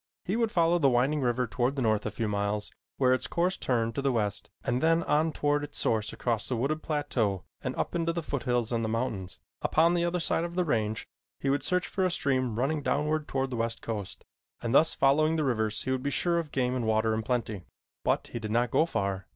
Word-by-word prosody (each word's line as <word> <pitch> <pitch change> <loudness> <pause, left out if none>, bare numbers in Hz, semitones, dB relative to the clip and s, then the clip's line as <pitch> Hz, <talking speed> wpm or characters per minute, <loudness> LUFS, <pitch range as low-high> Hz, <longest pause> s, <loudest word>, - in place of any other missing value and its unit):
He 190 - -1
would 230 -2 +1
follow 170 0 +3
the 140 -4 +4
winding 135 +4 +2
river 125 0 +1
toward 125 +3 -1
the 135 - -2
north 110 -2 +1
a - - 0
few 110 +1 -3
miles 105 0 -1 0.3
where 130 -1 +4
its 130 - -1
course 180 +2 +1
turned 115 -3 0
to 140 - -2
the 135 0 +2
west 105 -4 -1
and 125 -1 0
then 165 +1 +3
on 155 +2 +2
toward 145 0 0
its 145 - -7
source 110 -2 +1
across 115 -3 -1
a 125 - 0
wooded 140 +6 -1
plateau 125 - -1 0.2
and - - -3
up - - -2
into 165 -1 0
the 170 0 -3
foothills 125 -5 -1
and 115 -1 0
the 110 - -1
mountains. 110 -5 -3 0.2
Upon 165 +2 +3
the 175 -1 +1
other 175 +1 0
side 165 0 +1
of 170 0 -5
the 180 -1 +1
range 110 -7 -1 0.3
he 135 - 0
would 140 - +1
search 180 -1 0
for 190 - -1
a 185 - +3
stream 130 -8 0
running 145 +5 0
downward 150 +2 0
toward 135 0 -1
the 120 - -3
west 115 0 -2
coast, 105 -4 -5 0.3
and 115 - -2
thus 160 +3 +5
following 155 +4 +3
the 155 - +1
rivers 110 -5 0
he 130 - -2
would 130 -1 0
be 140 - -1
sure 170 +4 +2
of 160 -3 -5
game 125 -1 0
and 120 -3 -1
water 110 0 +2
in 110 - 0
plenty. 110 -6 -2 0.4
But - - +1
he 120 - -2
did 110 -1 -5
not 120 +2 +1
go 160 - +3
far. 100 - -2
130 Hz, 240 wpm, -29 LUFS, 115-155 Hz, 0.4 s, thus